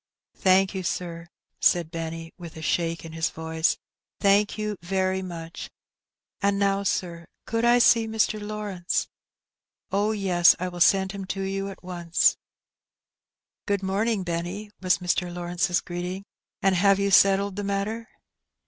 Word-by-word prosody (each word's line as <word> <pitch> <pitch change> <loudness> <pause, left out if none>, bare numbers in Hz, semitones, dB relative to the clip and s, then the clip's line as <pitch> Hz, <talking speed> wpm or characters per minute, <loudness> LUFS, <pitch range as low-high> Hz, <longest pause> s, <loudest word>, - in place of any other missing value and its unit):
'' - - -68
*' - - -49
Thank 190 +1 +3
you, 190 - -3
sir," 170 -1 -4 0.3
said 170 -2 +3
Benny, 165 0 -5
with 170 -3 -10
a 160 - -8
shake 165 +1 -1
in 165 - -8
his 160 0 0
voice, 160 0 -1 0.4
''thank 205 +2 +3
you 210 -1 -2
very 190 +1 0
much; 170 -2 -7 0.7
and 200 -1 +2
now, 200 0 +2
sir, 170 -4 -2 0.2
could 230 0 -1
I 240 +1 +5
see 230 -2 +5
Mr. 220 -1 0
Lawrence? 205 -4 -2 0.4
" - - -57
"Oh, 205 +2 +1
yes, 185 -5 +4
I 185 +1 -2
will 175 0 -8
send 190 +1 +4
him 195 -1 -6
to 195 +1 -3
you 195 +1 -2
at 195 - -11
once." 175 -2 +2 1.3
''Good 200 -1 0
morning, 200 +2 0
Benny," 180 +5 -4
was 185 +1 +3
Mr. 180 0 -1
Lawrence's 175 +1 -1
greeting; 180 +2 -5 0.4
"and 195 0 +4
have 195 +2 +4
you 200 0 0
settled 195 +1 +4
the 205 - -3
matter?" 200 +4 -2
190 Hz, 155 wpm, -25 LUFS, 175-200 Hz, 1.3 s, I